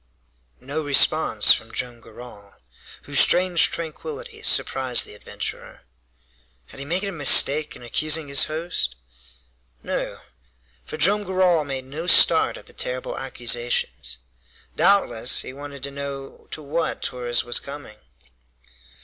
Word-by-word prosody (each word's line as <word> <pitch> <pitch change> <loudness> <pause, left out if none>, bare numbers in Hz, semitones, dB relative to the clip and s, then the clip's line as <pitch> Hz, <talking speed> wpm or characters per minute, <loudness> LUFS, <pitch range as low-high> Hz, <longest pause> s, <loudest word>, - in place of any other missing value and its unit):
No 145 +4 -4
response 145 -5 +4
from 115 - -6
Joam 120 -2 -5
Garral, 110 -3 -14 0.5
whose - - +2
strange 180 -2 +5
tranquillity 440 - -7
surprised 130 - +1
the - - -12
adventurer. 105 - -8 0.9
Had - - -11
he 140 - -6
made 180 +5 0
a 200 - -2
mistake 150 -2 +4
in - - -13
accusing 155 +5 0
his 140 -1 +3
host? 155 - -3 0.9
No! - - -4 0.6
For - - -8
Joam 200 +7 +4
Garral 185 -4 +1
made 135 -2 -5
no 155 +6 -7
start - - +5
at - - -13
the - - -14
terrible 125 0 -4
accusations. 120 - -2 0.6
Doubtless 165 - +2
he - - -9
wanted 140 0 -10
to 140 - -5
know 140 -1 -8
to 155 - -7
what 150 +4 -2
Torres 120 -1 -1
was 120 0 -1
coming. 140 -7 -10
140 Hz, 130 wpm, -23 LUFS, 125-165 Hz, 0.9 s, strange